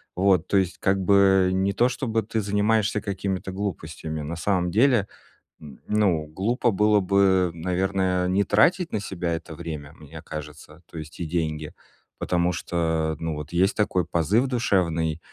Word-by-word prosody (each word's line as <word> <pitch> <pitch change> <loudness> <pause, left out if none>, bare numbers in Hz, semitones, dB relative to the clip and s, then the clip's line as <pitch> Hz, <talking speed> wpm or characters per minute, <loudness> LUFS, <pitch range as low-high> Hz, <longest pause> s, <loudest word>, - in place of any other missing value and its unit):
Вот, 95 0 +2
то 100 - +2
есть 95 -2 0
как 95 0 +2
бы 95 -1 +4
не 95 +1 +1
то, 120 +5 +3
чтобы 115 -3 -1
ты 110 +1 -2
занимаешься 105 +1 +1
какими-то 95 -2 -3
глупостями. 80 -5 -5
На 75 +3 -5
самом 90 0 0
деле, 115 0 +3 0.5
м, 70 -4 -12
ну, 95 -8 +1
глупо 115 +9 0
было 105 +1 +3
бы, 95 -2 +3
наверное, 90 +1 0
не 95 +2 +2
тратить 165 - +2
на - - 0
себя 90 -4 -3
это 80 -1 -6
время, 80 -3 -7
мне 80 0 -12
кажется, 75 +1 -9
то - - -10
есть 80 0 -9
и 85 - -3
деньги, 80 -2 -3 0.4
потому 90 0 0
что, 80 -2 -1
ну, 80 -1 -3
вот 75 0 -7
есть 90 +3 +2
такой 95 -5 +1
позыв 85 - +1
душевный, 85 - 0
90 Hz, 160 wpm, -24 LUFS, 80-100 Hz, 0.5 s, бы